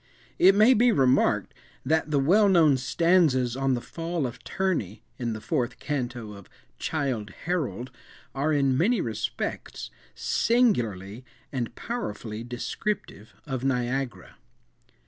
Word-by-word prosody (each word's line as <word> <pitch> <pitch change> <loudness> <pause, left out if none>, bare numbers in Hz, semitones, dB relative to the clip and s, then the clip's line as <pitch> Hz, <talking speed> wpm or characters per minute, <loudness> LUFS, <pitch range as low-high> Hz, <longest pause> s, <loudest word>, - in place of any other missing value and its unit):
It 190 +2 +7
may 215 +5 +6
be 245 +1 +4
remarked, 135 - +2 0.3
that 160 +2 +1
the 150 - +1
well 195 +10 +4
known 165 -6 +5
stanzas 130 -2 +2
on 135 -1 +1
the 120 - -4
"Fall 165 +3 -3
of 120 -1 -7
Terni," 160 - -2 0.2
in 120 -2 -2
the 110 - -5
fourth 120 +1 -2
canto 120 -6 -4
of 100 -2 -13 0.3
"Childe 130 -9 -2 0.2
Harold," 150 -7 -2 0.4
are, 140 +3 0
in 140 -3 +2
many 210 - +2
respects, 110 -7 -4 0.2
singularly 120 - +1 0.3
and 120 -4 -3
powerfully 115 - -5
descriptive 120 - -4
of 130 -3 -4
Niagara. 130 -1 -2
135 Hz, 125 wpm, -26 LUFS, 120-170 Hz, 0.4 s, It